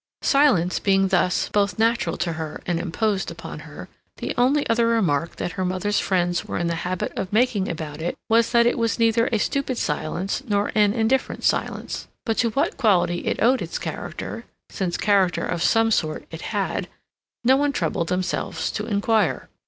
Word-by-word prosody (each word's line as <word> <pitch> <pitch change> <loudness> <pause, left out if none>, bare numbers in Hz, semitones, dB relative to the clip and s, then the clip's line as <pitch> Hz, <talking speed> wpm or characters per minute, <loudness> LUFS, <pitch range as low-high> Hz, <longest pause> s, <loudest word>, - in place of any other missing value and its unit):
Silence 255 - +3
being, 195 -1 +2
thus, 180 -1 +2
both 200 0 +1
natural 225 -6 +1
to 170 -1 -1
her 160 -1 -5
and 175 -2 0
imposed 195 +3 -1
upon - - -8
her, - - -10 0.3
the - - -3
only 265 +4 +2
other 230 0 +2
remark 170 -9 +1
that - - -3
her 185 - -3
mother's 185 +3 0
friends 175 -2 0
were - - -4
in 175 - -1
the 170 - 0
habit 180 0 -3
of 185 - -3
making 215 -3 +2
about 155 -2 -5
it 175 - -2
was 230 0 +3
that 235 -1 +5
it 240 - +2
was 230 -1 +1
neither 230 0 +3
a 225 - +2
stupid 265 +3 -1
silence 170 +6 -2
nor 205 -1 +1
an 210 -2 +4
indifferent 235 +3 0
silence. - - -1 0.2
But 225 -3 0
to 230 - +3
what 275 +5 -1
quality 180 -7 +2
it - - 0
owed 255 +3 +4
its - - -4
character, - - -6 0.3
since 180 -3 -2
character 195 -5 +2
of 175 -2 -2
some 225 +3 +3
sort 155 -7 0
it - - -7
had, - - -2 0.6
no 255 +2 +5
one 290 +1 +2
troubled 170 -10 -1
themselves 180 0 -2
to 210 - -4
inquire. 205 - +1
205 Hz, 185 wpm, -23 LUFS, 175-230 Hz, 0.6 s, that